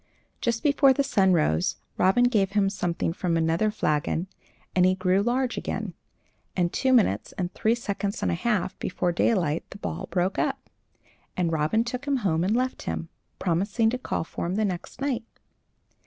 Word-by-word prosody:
Just 235 -1 0
before 280 -2 +5
the 280 - +1
sun 195 -8 +3
rose, 85 - +2 0.2
Robin 190 +7 +4
gave 210 -6 +2
him 200 -2 +2
something 170 -3 -1
from 170 -2 0
another 165 +6 +2
flagon, 155 -4 0 0.5
and 180 - +5
he 185 +1 +4
grew 185 +1 +2
large 245 +3 0
again, - - -4 0.6
and 175 -2 +1
two 260 - +1
minutes 205 - +2
and 180 -1 -3
three 225 +2 +2
seconds 205 -3 -3
and - - +1
a - - +1
half 190 +1 0
before 180 -1 -1
daylight 170 -4 +1
the - - -10
ball 190 -2 -5
broke 185 +1 0
up, - - -2 0.7
and 175 -2 +1
Robin 160 +8 +2
took 250 +3 -5
him 280 -1 +1
home 165 -2 +2
and 200 +5 +1
left 255 +1 -1
him, 165 - -4 0.3
promising 200 +6 +1
to 250 - -2
call - - -2
for 165 - -5
him 180 - -2
the 215 +1 +1
next 185 +6 -5
night. 260 -5 -1
195 Hz, 180 wpm, -26 LUFS, 175-235 Hz, 0.7 s, before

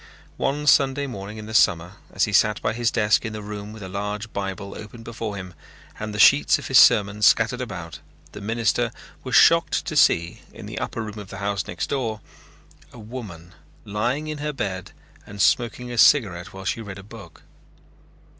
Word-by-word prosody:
One 145 +2 -1
Sunday 140 -1 +3
morning 105 -4 -7
in 110 - -8
the 110 - -8
summer 90 -2 +2
as 100 - 0
he 105 - 0
sat 105 +2 +3
by - - -1
his 120 0 0
desk 105 -2 +2
in 110 -2 -5
the 105 -1 -6
room 105 0 -7
with 110 -2 -10
a - - -6
large 105 +3 -5
Bible 100 0 -5
opened 110 +2 -10
before 110 -2 -5
him, 95 -2 -8 0.5
and 110 0 -4
the 105 - -6
sheets 75 -8 +6
of - - -8
his - - +7
sermon 105 0 +5
scattered 115 +4 +3
about, 90 -9 -7 0.3
the 105 - -10
minister 115 +2 0 0.3
was - - -2
shocked - - +5
to - - -4
see, 85 0 +3
in - - -11
the - - -6
upper 115 - -4
room 105 0 -7
of 100 -2 -10
the 100 - -8
house 100 -1 -2
next 90 - -3
door, 115 -6 -2 0.7
a - - -14
woman 105 -7 -9 0.3
lying 120 +9 -2
in 155 -1 -5
her 150 0 -3
bed 95 -8 -4 0.4
and 100 - -10
smoking 120 +3 +1
a 120 - -3
cigarette 95 -13 +4
while 95 0 -10
she 115 - -2
read 100 -3 -8
a 95 - -10
book. 100 -6 -13
105 Hz, 195 wpm, -23 LUFS, 100-115 Hz, 0.7 s, his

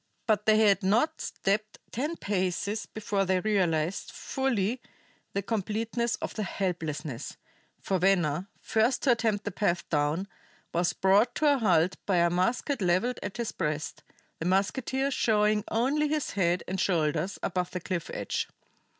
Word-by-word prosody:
But 215 -2 +1
they 215 0 +6
had 205 -3 +4
not 235 +12 +2
stepped 215 +2 -1
ten 295 +8 -2
paces 200 - -1
before 205 -2 -1
they 185 -1 +2
realized 180 -4 0
fully 250 -3 -1 0.5
the 200 - -1
completeness 225 +3 -1
of - - -5
their 215 - -2
helplessness, 155 -8 -3 0.4
for 190 -1 -1
Venner, 180 -2 +2
first 225 +4 +1
to 270 - +5
attempt 220 -3 +1
the 205 - -2
path 175 -2 0
down, 150 +5 0 0.5
was 175 +1 +1
brought 205 +6 +3
to 295 -2 +4
a 275 - 0
halt 180 -5 +3
by 195 - +2
a 170 0 +4
musket 235 - 0
leveled 185 +8 +1
at 205 - -5
his 235 -2 -2
breast, 150 -2 -3 0.4
the 160 - -4
musketeer 260 +9 +1
showing 210 -4 +2
only 275 +7 +1
his 300 -1 -1
head 175 -2 +1
and 190 0 -2
shoulders 165 +1 0
above 180 -1 -1
the 180 - -4
cliff 175 -1 -3
edge. - - -2
200 Hz, 150 wpm, -28 LUFS, 180-225 Hz, 0.5 s, they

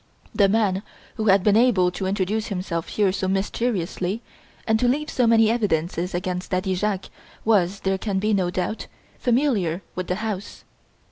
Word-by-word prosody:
The 200 -2 +4
man 200 -3 +2 0.3
who 220 - -3
had 195 -1 +5
been 210 0 +4
able 215 -7 +4
to 190 +1 -3
introduce 200 +3 -1
himself 180 -4 -3
here 205 -3 +1
so 190 0 -2
mysteriously 195 0 -1 0.4
and 220 0 +2
to 245 - +2
leave 295 +5 0
so 245 -2 +2
many 225 -1 +5
evidences 180 -5 -1
against 180 0 -3
Daddy 185 +1 0
Jacques, 195 0 -2 0.3
was, 200 -3 +2
there 190 0 0
can 200 -2 -2
be 210 +3 +1
no 185 -3 +1
doubt, 185 +4 -3 0.3
familiar 230 - +1
with 185 -1 -4
the 180 - 0
house. 210 -1 -5
195 Hz, 165 wpm, -23 LUFS, 185-220 Hz, 0.4 s, had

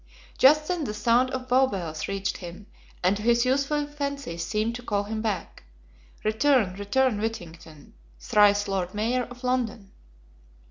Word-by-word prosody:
Just 300 +3 +6
then 355 -4 -1
the 210 - -4
sound 235 +4 +3
of 255 -1 -5
Bow 260 +1 +4
Bells 170 -8 -4
reached 195 0 -2
him, 180 +3 -9 0.4
and 185 +3 +3
to - - -6
his 235 +2 +3
youthful 280 +3 +1
fancy 280 -8 -5
seemed 215 +7 -1
to 245 - -7
call 205 -4 -1
him 215 +1 -4
back: 210 -6 -3 0.6
"Return, 220 -2 +2
return, 210 +3 +1
Whittington; 165 -8 -7 0.3
Thrice 205 - +3
Lord 190 -1 -2
Mayor 240 +4 0
of 245 +1 -13
London." 235 -6 -2
220 Hz, 150 wpm, -26 LUFS, 195-255 Hz, 0.6 s, Just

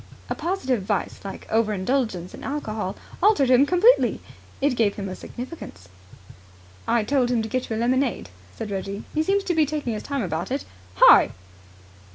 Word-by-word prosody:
A - - +3
positive 300 - -1
vice 200 +1 -2
like 195 - -7
over 220 -1 +2
indulgence 195 -3 -1
in - - -10
alcohol 215 -9 -3 0.3
altered 350 - +4
him 260 +3 +6
completely. 405 +9 +4 0.4
It 280 -2 +1
gave 220 -4 +1
him 200 -1 -5
a 185 - -5
significance. 240 - -9 1.0
"I 235 - +2
told 255 +1 +1
him 235 -2 +1
to - - -4
get 255 +3 -3
you 220 - -2
a - - -3
lemonade," 250 - 0 0.3
said 210 - -5
Reggie. 195 +1 -4
"He 310 - +1
seems 390 +5 +1
to 360 - -1
be 315 -3 +3
taking 290 -5 -2
his 215 - -4
time 280 -4 -3
about 170 0 -3
it. 270 +2 -3 0.3
Hi!" - - +7
245 Hz, 180 wpm, -24 LUFS, 205-285 Hz, 1.0 s, Hi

